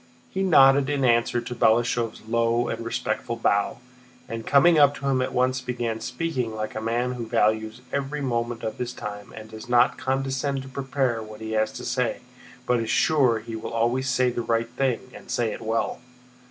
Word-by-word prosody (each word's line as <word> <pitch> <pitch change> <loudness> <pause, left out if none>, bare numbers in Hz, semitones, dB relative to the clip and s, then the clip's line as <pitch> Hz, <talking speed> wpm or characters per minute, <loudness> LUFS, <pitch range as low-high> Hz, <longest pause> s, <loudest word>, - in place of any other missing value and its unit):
He 190 - -2
nodded 140 -6 +5
in 140 -2 +1
answer 120 0 +2
to 120 - -6
Balashëv's 120 0 +1
low 115 +1 +1
and 115 +1 -4
respectful 115 +1 -2
bow, 100 -3 +1 0.5
and 115 0 -6
coming 155 +3 +5
up 145 0 +6
to 140 - -5
him 130 -2 +2
at 130 - -1
once 130 +1 +1
began 120 -3 -3
speaking 125 -4 -3
like 110 0 -4
a 110 - -4
man 120 +3 0
who 120 -2 -5
values 110 0 +1
every 140 +1 -2
moment 120 -3 -2
of 110 - -4
his 125 0 -3
time 105 -2 -7
and 110 0 -10
does 110 +2 -10
not 120 0 +4
condescend 135 +1 -1
to 135 - -10
prepare 135 -3 -1
what 110 -1 -10
he 110 0 -6
has 110 0 +1
to - - -7
say 125 -3 -1 0.4
but 125 -1 +2
is 115 -1 -3
sure 135 -7 +3
he 115 0 -7
will 110 +1 -6
always 120 +3 +1
say 125 0 +2
the 120 - -3
right 115 0 0
thing 130 -1 -2
and - - -13
say 115 -2 0
it - - -8
well. 115 0 -1
120 Hz, 195 wpm, -25 LUFS, 115-130 Hz, 0.5 s, up